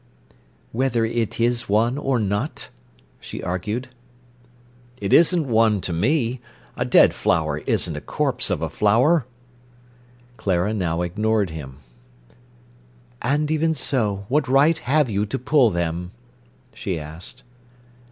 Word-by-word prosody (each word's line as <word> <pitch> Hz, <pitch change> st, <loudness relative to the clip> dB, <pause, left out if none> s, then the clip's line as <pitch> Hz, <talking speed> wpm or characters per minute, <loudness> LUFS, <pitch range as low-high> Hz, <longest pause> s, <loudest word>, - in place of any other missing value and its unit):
"Whether 120 Hz, -2 st, 0 dB
it 115 Hz, -1 st, -2 dB
is 120 Hz, 0 st, +1 dB
one 115 Hz, +5 st, +2 dB
or 135 Hz, -3 st, 0 dB
not?" 105 Hz, +6 st, -2 dB, 0.5 s
she -, -, -8 dB
argued. 105 Hz, +8 st, -3 dB, 1.1 s
"It 100 Hz, -1 st, -1 dB
isn't 170 Hz, -2 st, +4 dB
one 110 Hz, -3 st, +3 dB
to 85 Hz, -, -3 dB
me. 120 Hz, -, 0 dB, 0.3 s
A -, -, -1 dB
dead -, -, +5 dB
flower 75 Hz, -2 st, 0 dB
isn't -, -, 0 dB
a -, -, -5 dB
corpse -, -, -1 dB
of -, -, -1 dB
a -, -, -1 dB
flower." 125 Hz, +7 st, +3 dB, 1.1 s
Clara 95 Hz, +2 st, 0 dB
now 90 Hz, -4 st, -1 dB
ignored 105 Hz, +1 st, 0 dB
him. 70 Hz, -3 st, -9 dB, 1.4 s
"And 150 Hz, +4 st, 0 dB
even 160 Hz, +1 st, +1 dB
so—what 115 Hz, +1 st, 0 dB
right 145 Hz, +5 st, +4 dB
have 150 Hz, +1 st, +2 dB
you 105 Hz, -1 st, -1 dB
to -, -, -3 dB
pull 140 Hz, -1 st, +3 dB
them?" 85 Hz, 0 st, -3 dB, 0.6 s
she 95 Hz, -5 st, -4 dB
asked. 80 Hz, +11 st, -7 dB
110 Hz, 125 wpm, -22 LUFS, 95-135 Hz, 1.4 s, dead